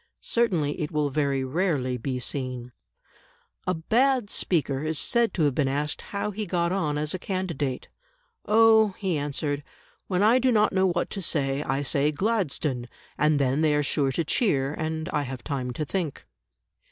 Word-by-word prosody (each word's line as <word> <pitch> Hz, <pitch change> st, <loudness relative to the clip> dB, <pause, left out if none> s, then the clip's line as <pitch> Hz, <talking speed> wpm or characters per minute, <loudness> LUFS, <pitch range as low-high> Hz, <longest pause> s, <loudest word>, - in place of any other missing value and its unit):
Certainly 175 Hz, -11 st, 0 dB
it 150 Hz, -, -2 dB
will 150 Hz, -2 st, 0 dB
very 140 Hz, -2 st, 0 dB
rarely 135 Hz, -3 st, 0 dB
be 125 Hz, +1 st, -3 dB
seen. 125 Hz, -2 st, -4 dB, 1.0 s
A 185 Hz, -, +1 dB
bad 240 Hz, +6 st, +2 dB
speaker 145 Hz, -6 st, 0 dB
is 155 Hz, 0 st, -1 dB
said 235 Hz, +8 st, +2 dB
to 165 Hz, -, +1 dB
have 145 Hz, -2 st, +3 dB
been 140 Hz, 0 st, +1 dB
asked 145 Hz, +2 st, -2 dB
how 200 Hz, +1 st, -2 dB
he 210 Hz, +1 st, -4 dB
got 170 Hz, -1 st, 0 dB
on 155 Hz, -6 st, 0 dB
as 150 Hz, +1 st, -1 dB
a 185 Hz, -, -3 dB
candidate. 170 Hz, -9 st, -3 dB, 0.6 s
"Oh," 220 Hz, -2 st, +5 dB
he 190 Hz, -5 st, -1 dB
answered, 145 Hz, 0 st, -2 dB, 0.5 s
"when 185 Hz, +1 st, +1 dB
I 230 Hz, +4 st, +5 dB
do 255 Hz, 0 st, +3 dB
not 215 Hz, -3 st, +3 dB
know 190 Hz, 0 st, +3 dB
what 175 Hz, -1 st, -1 dB
to 195 Hz, -, -4 dB
say, 140 Hz, -4 st, 0 dB
I 140 Hz, -1 st, -1 dB
say 140 Hz, +2 st, +2 dB
'Gladstone,' 150 Hz, -, -1 dB, 0.3 s
and 150 Hz, +1 st, +3 dB
then 135 Hz, +2 st, +1 dB
they 155 Hz, -2 st, +3 dB
are 150 Hz, -, +2 dB
sure 140 Hz, -1 st, +1 dB
to 170 Hz, -, 0 dB
cheer, 145 Hz, -, +1 dB
and 160 Hz, 0 st, -3 dB
I 150 Hz, -, 0 dB
have 130 Hz, -2 st, -6 dB
time 130 Hz, -3 st, -3 dB
to 155 Hz, +5 st, -3 dB
think." 165 Hz, -3 st, -3 dB
155 Hz, 175 wpm, -26 LUFS, 140-190 Hz, 1.0 s, Oh